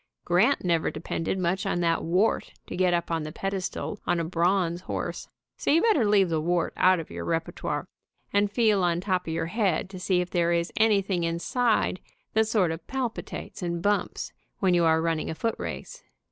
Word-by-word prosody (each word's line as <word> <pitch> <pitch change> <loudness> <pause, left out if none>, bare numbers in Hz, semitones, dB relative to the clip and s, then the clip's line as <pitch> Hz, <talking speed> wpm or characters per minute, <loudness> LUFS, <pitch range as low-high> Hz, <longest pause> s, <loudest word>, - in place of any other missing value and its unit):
Grant 195 +11 +3
never 170 -2 +2
depended 165 +3 -3
much 185 +1 0
on - - -1
that 165 -1 +1
wart 185 +7 +1
to - - -6
get 185 0 +3
up 170 -1 -1
on 165 -1 0
the 155 0 -5
pedestal 195 +3 -3
on 175 - +2
a - - 0
bronze 175 +1 +1
horse, - - -4 0.3
so - - -2
you 315 - +5
better 360 - +4
leave 200 -3 +4
the 160 -2 0
wart 175 +1 0
out 185 -1 +4
of 160 - -8
your - - -5
repertoire, 165 0 -2 0.5
and 205 0 +3
feel 210 -3 +3
on 175 -1 +2
top 185 -1 -1
of 160 - -2
your 165 0 -1
head 190 -1 0
to 185 - -7
see 180 0 +1
if 180 0 -2
there 170 -1 +2
is 170 0 -1
anything 200 -5 +2
inside 185 +5 +1 0.3
that 220 0 +3
sort 205 -7 +2
of 165 +1 -7
palpitates 255 -6 -4
and 170 -1 -3
bumps 205 0 -1 0.2
when 190 -2 +2
you 175 -1 +4
are 160 0 +3
running 165 -2 -1
a 160 - -3
footrace. 230 - -4
180 Hz, 195 wpm, -27 LUFS, 170-205 Hz, 0.5 s, you